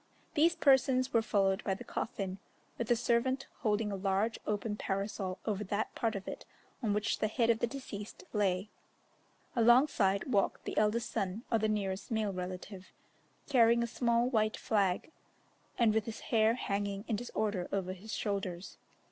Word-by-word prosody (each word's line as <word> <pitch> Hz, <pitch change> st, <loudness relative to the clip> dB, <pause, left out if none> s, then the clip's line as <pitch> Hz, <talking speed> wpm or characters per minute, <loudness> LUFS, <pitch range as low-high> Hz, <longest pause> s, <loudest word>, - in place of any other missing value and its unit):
These 330 Hz, +3 st, +4 dB
persons 265 Hz, -4 st, +3 dB
were 230 Hz, -, +5 dB
followed 195 Hz, -2 st, +1 dB
by 195 Hz, -, 0 dB
the -, -, -9 dB
coffin, 195 Hz, -3 st, -4 dB, 0.4 s
with 235 Hz, 0 st, -2 dB
a 240 Hz, -, +5 dB
servant 245 Hz, +3 st, +1 dB
holding 215 Hz, -4 st, 0 dB
a -, -, -2 dB
large 195 Hz, +3 st, 0 dB
open 210 Hz, 0 st, -1 dB
parasol 195 Hz, -2 st, -3 dB
over 210 Hz, -2 st, -1 dB
that 205 Hz, +3 st, -2 dB
part 225 Hz, -2 st, -1 dB
of 195 Hz, -, -6 dB
it -, -, -6 dB, 0.4 s
on 220 Hz, -4 st, 0 dB
which 210 Hz, 0 st, 0 dB
the 215 Hz, -, +2 dB
head 230 Hz, +1 st, +2 dB
of 225 Hz, -, 0 dB
the 240 Hz, -, +1 dB
deceased 225 Hz, -6 st, -7 dB
lay. 195 Hz, -1 st, 0 dB, 0.8 s
Alongside 235 Hz, -5 st, +4 dB
walked 205 Hz, -7 st, +1 dB
the -, -, -4 dB
eldest 215 Hz, +2 st, +1 dB
son 195 Hz, +4 st, -2 dB
or 225 Hz, -, +3 dB
the 215 Hz, 0 st, +1 dB
nearest 195 Hz, -2 st, -2 dB
male 220 Hz, -4 st, 0 dB
relative, 185 Hz, +1 st, -6 dB, 0.6 s
carrying 235 Hz, -3 st, +5 dB
a -, -, +1 dB
small 235 Hz, 0 st, +1 dB
white 215 Hz, -4 st, +1 dB
flag, 200 Hz, -, 0 dB, 0.7 s
and 230 Hz, -3 st, +4 dB
with 220 Hz, -1 st, +1 dB
his 225 Hz, -1 st, -6 dB
hair 220 Hz, 0 st, +5 dB
hanging 200 Hz, -2 st, -2 dB
in 220 Hz, -, 0 dB
disorder 210 Hz, -5 st, -2 dB
over 185 Hz, -2 st, -1 dB
his 205 Hz, +4 st, -10 dB
shoulders. 195 Hz, -3 st, -3 dB
215 Hz, 165 wpm, -32 LUFS, 195-235 Hz, 0.8 s, were